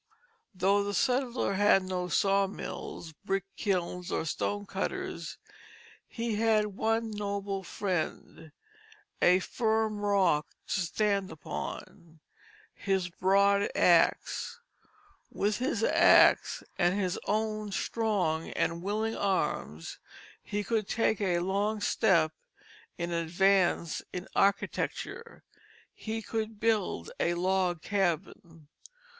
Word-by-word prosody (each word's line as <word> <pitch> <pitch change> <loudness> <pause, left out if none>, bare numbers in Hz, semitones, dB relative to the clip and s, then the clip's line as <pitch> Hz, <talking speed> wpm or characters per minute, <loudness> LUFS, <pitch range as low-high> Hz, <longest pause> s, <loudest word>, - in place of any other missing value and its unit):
Though 200 +2 +3
the 205 0 -3
settler 250 +2 +1
had 195 -1 +4
no 185 -1 -3
sawmills, 195 -3 -1
brick 195 -1 -1
kilns, 180 -3 -2
or - - -1
stone 205 +6 -2
cutters, 370 - -4 0.7
he 230 -2 -3
had 215 -2 +2
one 225 +1 0
noble 200 -1 -3
friend, 170 -4 -4 0.7
a 180 +1 +6
firm 220 +1 0
rock 190 -7 +2 0.2
to - - 0
stand 200 +2 0
upon, 170 +1 -7 0.5
his 190 -3 -1
broad 200 +3 +3
axe. 180 - +2 0.7
With 205 +2 -1
his 265 - -1
axe, - - +5 0.2
and 180 +2 +2
his 185 -3 -1
own 215 0 -1
strong 195 -8 -1
and 170 0 -1
willing 215 +4 -1
arms, 80 - -2 0.4
he 205 0 -3
could 215 -1 -1
take 220 -2 +1
a 180 -3 +1
long 200 +4 0
step 185 -7 +3 0.7
in 175 0 -3
advance 175 0 +2
in 180 0 -6
architecture; 335 - -1 0.5
he 225 0 -5
could 220 -1 -4
build 210 - 0
a 170 0 +1
log 180 -1 0
cabin. 175 -4 -2
195 Hz, 105 wpm, -30 LUFS, 180-215 Hz, 0.7 s, a